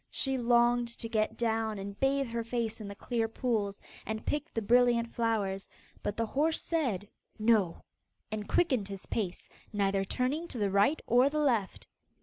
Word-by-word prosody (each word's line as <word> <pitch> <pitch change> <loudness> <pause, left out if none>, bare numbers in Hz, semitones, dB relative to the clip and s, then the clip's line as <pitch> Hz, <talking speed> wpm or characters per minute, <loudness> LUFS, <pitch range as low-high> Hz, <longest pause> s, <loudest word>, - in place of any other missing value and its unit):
She 270 -1 -1
longed 240 -1 +3
to 230 - -4
get 220 -1 0
down 225 -2 0
and 200 0 -7
bathe 275 +1 +2
her 230 0 -2
face 230 -1 -2
in 210 - -6
the 200 - -7
clear 230 +2 -1
pools, 220 -4 -1 0.2
and 220 0 -4
pick 295 +2 -2
the - - -1
brilliant 235 +1 +3
flowers, 205 -4 -1 0.3
but 205 - -3
the 230 - +1
horse 305 +7 +1
said 245 - -1 0.3
'No,' 215 -6 +2 0.5
and 215 -1 -4
quickened 260 - +2
his 195 -1 -7
pace, 190 -6 -3 0.2
neither 195 -1 +1
turning 265 - -1
to 260 - -7
the 205 -3 0
right 205 +10 +3
or 250 +4 +5
the 305 - -3
left. 240 -10 +1
230 Hz, 170 wpm, -31 LUFS, 205-250 Hz, 0.5 s, or